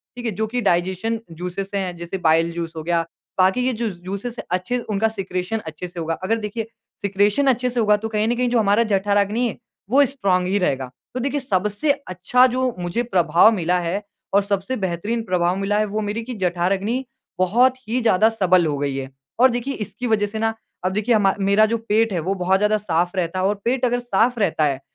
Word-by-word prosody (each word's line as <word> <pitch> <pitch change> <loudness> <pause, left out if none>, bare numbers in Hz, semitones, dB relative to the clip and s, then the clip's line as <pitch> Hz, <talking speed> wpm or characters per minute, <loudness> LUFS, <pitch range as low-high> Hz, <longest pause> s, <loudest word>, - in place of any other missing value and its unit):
ठीक 245 0 -7
है 225 - 0
जो 220 +3 -2
कि 245 +3 -2
डाइजेशन 190 +4 0
जूसेज़ 180 +4 -5
हैं 185 -3 -2
जैसे 170 +3 -5
बाइल 165 +1 +3
जूस 165 -1 -4
हो 160 - -5
गया। 170 +1 +1 0.4
बाकी 190 +6 +4
ये 260 - +2
जो 230 0 -2
जूसेज़ 195 +5 -6
है - - -4
अच्छे 185 +7 0
उनका 215 +1 +2
सिक्रेशन 195 -1 -3
अच्छे 160 +3 -6
से 175 -1 -9
होगा। 165 0 -2
अगर 225 +4 +1
देखिए 220 +1 -4 0.3
सिक्रेशन 205 +6 +2
अच्छे 250 -1 +2
से 245 0 -2
होगा 210 -2 +4
तो 220 +2 -4
कहीं 215 0 0
न 240 - +1
कहीं 245 0 +1
जो 240 - +2
हमारा 210 +1 +3
जठराग्नि 205 +2 +1
है 225 - -5 0.3
वो 275 +5 +5
स्ट्रॉंग 195 -9 0
ही 195 +2 +1
रहेगा। 135 -8 -1 0.2
तो 255 - -3
देखिए 280 +3 -1
सबसे 210 +3 0 0.2
अच्छा 185 +8 +3
जो 255 0 0
मुझे 175 +7 -1
प्रभाव 175 -3 +4
मिला 180 -2 +1
है 175 +4 -2 0.3
और 200 - +5
सबसे 200 +4 -2
बेहतरीन 205 +6 -2
प्रभाव 180 -1 +1
मिला 195 +1 0
है 215 - +2
वो 210 +1 -3
मेरी 210 +2 -3
कि 250 +2 -6
जठराग्नि 195 +8 0 0.3
बहुत 245 +8 +3
ही 245 +3 0
ज़्यादा 220 -1 +4
सबल 185 -5 +3
हो 150 -2 -1
गई 140 -1 -2
है। 135 -1 -5 0.3
और 260 +2 +7
देखिए 245 +3 -2
इसकी 215 +1 -5
वज़ह 210 -2 +2
से 220 +2 -5
ना 225 0 +1 0.3
अब 185 - 0
देखिए 215 +3 +2
हम 195 -3 +3
मेरा 200 +2 +4
जो 230 +2 0
पेट 220 0 +3
है 175 - 0
वो 180 +5 -1
बहुत 185 +1 +2
ज़्यादा 210 +1 +2
साफ 175 -3 -1
रहता 180 0 -1
है 185 - +1
और 205 +2 +2
पेट 255 +2 +1
अगर 245 0 +1
साफ 240 +1 +1
रहता 170 -6 +1
है 140 -2 0
205 Hz, 220 wpm, -22 LUFS, 180-230 Hz, 0.4 s, और